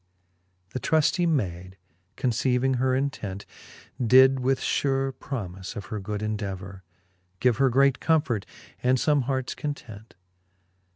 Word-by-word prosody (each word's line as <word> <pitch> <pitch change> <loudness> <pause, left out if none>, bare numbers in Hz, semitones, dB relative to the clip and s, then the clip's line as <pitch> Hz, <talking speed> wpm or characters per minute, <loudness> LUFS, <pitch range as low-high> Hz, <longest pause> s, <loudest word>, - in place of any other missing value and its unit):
XXXV. 90 0 -44
The 130 - -2
truftie 160 +5 +2
mayd, 95 - -2 0.4
conceiving 125 +2 +1
her 130 0 +2
intent. 110 -8 -3 0.6
Did 130 +3 +6
with 130 +1 +1
fure 135 -1 0
promife 95 -9 -6
of 105 - -6
her 105 - -2
good 105 +1 -4
indevour 100 -3 -4 0.6
Give 125 -3 +2
her 135 -1 +4
great 135 +1 +3
comfort, 145 -10 +1 0.3
and 130 +1 +3
fome 145 0 +2
harts 130 -1 -2
content. 115 -7 -7
125 Hz, 125 wpm, -26 LUFS, 95-135 Hz, 0.6 s, Did